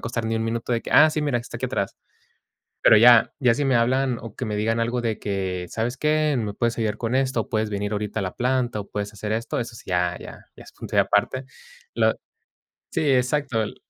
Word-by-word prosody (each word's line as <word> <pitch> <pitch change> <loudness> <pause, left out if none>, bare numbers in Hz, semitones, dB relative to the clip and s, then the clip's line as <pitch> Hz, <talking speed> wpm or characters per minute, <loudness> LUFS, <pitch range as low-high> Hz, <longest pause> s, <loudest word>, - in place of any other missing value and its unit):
costar 115 -1 -3
ni 115 - -1
1, 110 - -1
minuto", 115 +1 -2
de 115 - 0
que" - - -8
,"Ah, 155 - +7
sí, 155 0 -2
mira, 145 -5 0
está 120 - -8
aquí - - -4
atrás". - - -3 0.9
Pero 110 - +7
ya 120 +1 +7
ya 125 -5 +3
si 145 - -1
me 130 -3 +3
hablan 125 +1 +1
o 115 -2 -9
que - - -5
me 105 -3 -3
digan 115 +2 0
algo 120 +2 0
de 115 -2 -2
que: 95 -3 -3
"¿Sabes 120 +3 -2
qué? 155 0 +1
Me 110 -4 -2
puedes 115 +1 -1
ayudar 110 -1 -1
con 115 +1 -3
esto, 130 -3 +1
o - - -15
puedes 110 -1 -1
venir 105 +1 -3
ahorita 105 +1 -3
a - - -1
la 95 - -5
planta 125 -3 0
o 100 - -9
puedes 105 0 -4
hacer 105 0 -6
esto", 110 +2 -2
eso 115 -1 -6
sí, - - -13
ya, 90 0 +1
ya, - - -10 0.2
ya - - -13
es - - -15
punto - - -6
y - - +5
aparte. 130 +1 +1 0.5
Lo - - +3 0.8
Sí, - - -1
exacto 130 -1 +1
l 110 - -4
115 Hz, 240 wpm, -23 LUFS, 105-125 Hz, 0.9 s, Ah